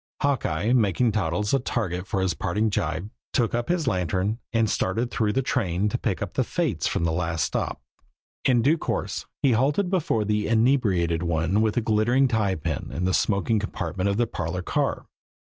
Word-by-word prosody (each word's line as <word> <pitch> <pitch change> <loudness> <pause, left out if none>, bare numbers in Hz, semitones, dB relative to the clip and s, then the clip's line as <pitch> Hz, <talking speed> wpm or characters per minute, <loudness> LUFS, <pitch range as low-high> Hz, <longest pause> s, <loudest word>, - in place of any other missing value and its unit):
Hawkeye, 115 - +1
making 115 0 +3
Toddles 105 +1 -1
a 135 - +4
target 95 -7 -2
for 95 -4 -1
a - - +2
parting 105 +5 0
gibe, 85 +3 -2 0.2
took 115 -3 +1
up 120 +4 -1
his 175 -3 +1
lantern 95 0 0
and 115 -1 +2
started 110 +4 -1
through 110 -4 +1
the 135 - +1
train 105 -7 0
to - - -1
pick - - -1
up - - -6
the - - +1
fates - - -1
from - - -1
the 85 - +1
last 80 -1 -1
stop. - - -2 0.6
In 120 -3 +3
due 155 +4 +3
course - - -3 0.2
he 135 - +5
halted 145 - +2
before 145 - +1
the 105 0 0
inebriated 110 -9 +2
one 85 +4 +1
with 110 -1 +1
the 120 - +2
glittering 115 +5 +3
tie 105 -5 +1
pin 80 - -3
in 90 - -2
the 95 - +1
smoking 105 +3 +1
compartment 100 -2 -2
of 100 - 0
the 120 - +3
parlor 90 -3 -4
car. - - -1
105 Hz, 190 wpm, -25 LUFS, 90-120 Hz, 0.6 s, he